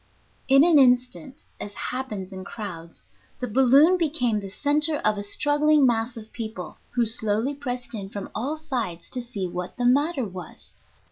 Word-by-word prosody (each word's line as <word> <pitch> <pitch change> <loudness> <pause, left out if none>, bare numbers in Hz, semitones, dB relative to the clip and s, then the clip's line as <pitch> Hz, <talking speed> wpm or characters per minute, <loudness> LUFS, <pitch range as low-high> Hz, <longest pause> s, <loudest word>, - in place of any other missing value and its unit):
In 275 +1 +7
an 330 -3 +6
instant, 255 +1 +2
as 205 - -6
happens 215 -7 -4
in 190 0 -7
crowds, 180 -6 -8 0.3
the 250 - -2
balloon 270 - +5
became 280 -9 +1
the 200 -1 -7
center 295 +8 +1
of 215 -5 +2
a 200 - -4
struggling 290 +7 +3
mass 230 0 +1
of 220 -1 -11
people, 220 -6 -6 0.2
who 240 -1 +3
slowly 225 +3 0
pressed 250 -3 -5
in 200 -3 -5
from 200 0 -7
all 270 +9 -2
sides 240 - -4
to 255 - -2
see 230 -6 -4
what 180 +1 -6
the 245 - -1
matter 280 +2 +2
was. 185 -4 -6
245 Hz, 165 wpm, -25 LUFS, 205-280 Hz, 0.3 s, In